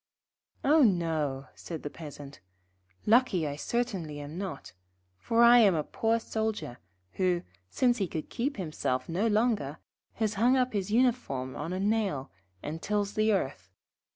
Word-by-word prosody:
'Oh 305 +3 +5
no,' 160 - +1
said 165 -3 -8
the 145 - -3
Peasant, 145 -3 -10 0.7
'lucky 220 -7 +4
I 145 -1 -3
certainly 185 -6 -2
am 145 +2 -7
not, 190 - -6 0.5
for 230 - +3
I 240 +1 +8
am 200 -6 +5
a 155 - 0
poor 225 +7 0
Soldier, 220 - -3 0.3
who, 180 -2 0 0.3
since 245 -2 +2
he 195 - 0
could 160 -2 -5
keep 275 +3 -2
himself 140 -8 -2
no 185 +7 0
longer, 210 - +1 0.4
has 220 -2 -1
hung 250 +3 +5
up 255 -1 +1
his 200 -2 -2
uniform 220 - +1
on 160 +3 -4
a 185 - -2
nail, 200 -10 0 0.3
and 160 +2 -5
tills 205 -1 -1
the 215 0 +2
earth. 190 -10 -2
195 Hz, 155 wpm, -29 LUFS, 155-230 Hz, 0.7 s, I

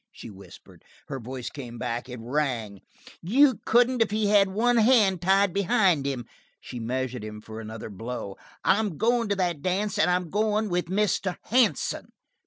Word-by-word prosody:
she - - -11
whispered. 95 -3 -15 0.3
Her 135 - -4
voice 125 +1 -6
came 125 -5 -8
back; 120 +2 -4
it 125 -1 -7
rang: 120 -5 -2 0.4
"You 260 - +4
couldn't 245 +1 +3
if 225 - +3
he 210 0 0
had 205 -1 +5
one 235 +5 +2
hand 215 -6 +4
tied 195 0 +3
behind 195 - +2
him." 130 -4 -3 0.3
She 125 - -8
measured 125 0 -3
him 105 0 -7
for 110 +1 -9
another 110 0 -8
blow. 100 -1 -6 0.3
"I'm 200 -4 +1
going 235 0 +1
to 200 - +1
that 175 -6 -1
dance 190 +5 -1
and 160 - +4
I'm 180 -2 0
going 215 +1 0
with 175 0 0
Mr. 190 0 0
Hansen." 245 -1 0
180 Hz, 170 wpm, -26 LUFS, -, 0.4 s, had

